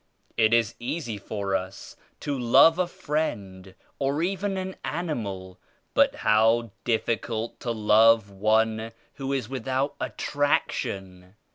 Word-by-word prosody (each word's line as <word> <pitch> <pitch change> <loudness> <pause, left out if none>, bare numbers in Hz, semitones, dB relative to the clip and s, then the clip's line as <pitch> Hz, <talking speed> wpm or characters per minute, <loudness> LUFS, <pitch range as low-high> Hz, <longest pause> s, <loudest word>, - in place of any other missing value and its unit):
It 110 -1 +3
is 115 -1 +3
easy 120 -4 -4
for 100 -1 -3
us 95 0 -5 0.3
to 145 - -2
love 135 +7 +5
a 180 - +2
friend 100 - -4 0.2
or 140 +3 0
even 195 +2 -1
an 190 0 -4
animal, 105 - -4 0.3
but - - +4
how 110 +1 +3
difficult 115 -1 -1
to 125 - -5
love 110 -1 +4
one 110 +2 +1 0.2
who 135 -1 -3
is 135 -5 -1
without 135 +2 -2
attraction. 95 -10 -2
115 Hz, 120 wpm, -26 LUFS, 105-140 Hz, 0.3 s, love